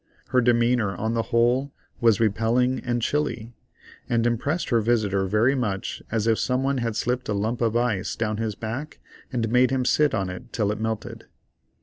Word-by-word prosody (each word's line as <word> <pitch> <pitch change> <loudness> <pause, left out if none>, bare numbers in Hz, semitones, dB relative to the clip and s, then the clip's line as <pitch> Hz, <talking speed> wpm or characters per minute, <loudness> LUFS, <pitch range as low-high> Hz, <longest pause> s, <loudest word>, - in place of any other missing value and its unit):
Her 125 0 +3
demeanor, 120 -4 +2
on 110 +5 -2
the 115 - +1
whole, 125 +3 +2 0.3
was 115 -3 +4
repelling 115 +4 +1
and 120 -1 -2
chilly, 120 -6 -1 0.6
and 115 -1 +1
impressed 140 +8 -1
her 115 -2 +3
visitor 105 -4 +1
very 110 +7 +3
much 105 -8 -3
as 110 -1 -1
if 115 -1 +2
some 130 +1 0
one 135 -1 0
had 115 -2 -2
slipped 125 +2 -1
a - - +1
lump 110 +4 -2
of 115 0 +2
ice 115 -6 -1
down 110 -2 -2
his 110 -2 -2
back 120 +8 -6 0.3
and 120 -3 -1
made 125 +1 +4
him 130 -1 0
sit 150 -1 +3
on 95 -2 -1
it 90 +7 -10
till 105 -3 0
it 105 - -4
melted. 110 -1 -4
115 Hz, 190 wpm, -24 LUFS, 110-125 Hz, 0.6 s, was